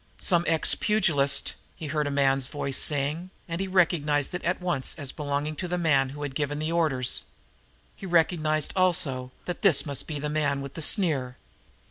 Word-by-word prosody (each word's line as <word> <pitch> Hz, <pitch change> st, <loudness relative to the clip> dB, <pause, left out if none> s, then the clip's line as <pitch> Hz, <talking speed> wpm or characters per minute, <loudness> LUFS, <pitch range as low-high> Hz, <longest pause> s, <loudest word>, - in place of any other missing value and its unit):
"Some 175 Hz, -3 st, +2 dB
ex 160 Hz, -1 st, +4 dB
pugilist," 150 Hz, -10 st, +2 dB, 0.2 s
he 160 Hz, -, -8 dB
heard 150 Hz, 0 st, -1 dB
a -, -, -1 dB
man's 135 Hz, -2 st, +1 dB
voice 140 Hz, -1 st, -3 dB
saying, 150 Hz, +5 st, -1 dB, 0.2 s
and 170 Hz, +1 st, -3 dB
he 195 Hz, -, -2 dB
recognized 160 Hz, -6 st, +1 dB
it 180 Hz, -, -4 dB
at 175 Hz, +2 st, 0 dB
once 175 Hz, -7 st, -1 dB
as 140 Hz, -4 st, -3 dB
belonging 145 Hz, 0 st, -3 dB
to 185 Hz, -, -3 dB
him 160 Hz, -7 st, +2 dB
who 145 Hz, +2 st, -7 dB
had 145 Hz, -2 st, -4 dB
given 145 Hz, 0 st, -2 dB
the 155 Hz, +2 st, -2 dB
orders. 145 Hz, -7 st, +1 dB, 0.7 s
He 195 Hz, -, -8 dB
recognized, 160 Hz, -3 st, +1 dB
also, 140 Hz, -9 st, +1 dB
that 175 Hz, +4 st, -5 dB
it 185 Hz, -9 st, +4 dB
must 140 Hz, -3 st, -3 dB
be 155 Hz, -, -4 dB
the 145 Hz, +1 st, -3 dB
man 145 Hz, -2 st, 0 dB
with 140 Hz, 0 st, -7 dB
the 165 Hz, -, -6 dB
sneer. 145 Hz, -, +1 dB
150 Hz, 180 wpm, -26 LUFS, 140-170 Hz, 0.7 s, ex